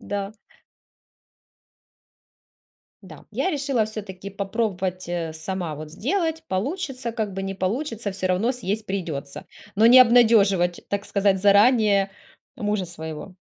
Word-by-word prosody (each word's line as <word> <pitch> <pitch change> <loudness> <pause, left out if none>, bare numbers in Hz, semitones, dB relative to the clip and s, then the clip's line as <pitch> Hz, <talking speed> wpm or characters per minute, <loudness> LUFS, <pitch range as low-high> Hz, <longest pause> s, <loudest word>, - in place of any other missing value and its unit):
Да. 200 0 -4 2.7
Да, - - -13
я 375 - -1
решила 275 - 0
всё-таки 200 -3 -7
попробовать, 195 -3 -3
э, 170 -2 -3
сама 170 0 -4
вот 150 +1 -9
сделать. 320 - -1
Получится, 255 - -3
как 215 -4 -3
бы, 195 - -4
не 195 0 -4
получится- 215 +3 -2
всё 185 -1 -2
равно 185 +6 +1
съесть 215 -3 -3
придётся, 155 -8 -5 0.3
но 220 +3 +5
не 250 +2 +9
обнадёживать, 215 -7 +4
так 200 0 -2
сказать, 200 -2 +1
заранее 205 -1 +4 0.5
мужа 210 -4 -1
своего. 160 +1 -8
200 Hz, 120 wpm, -23 LUFS, 185-230 Hz, 2.7 s, не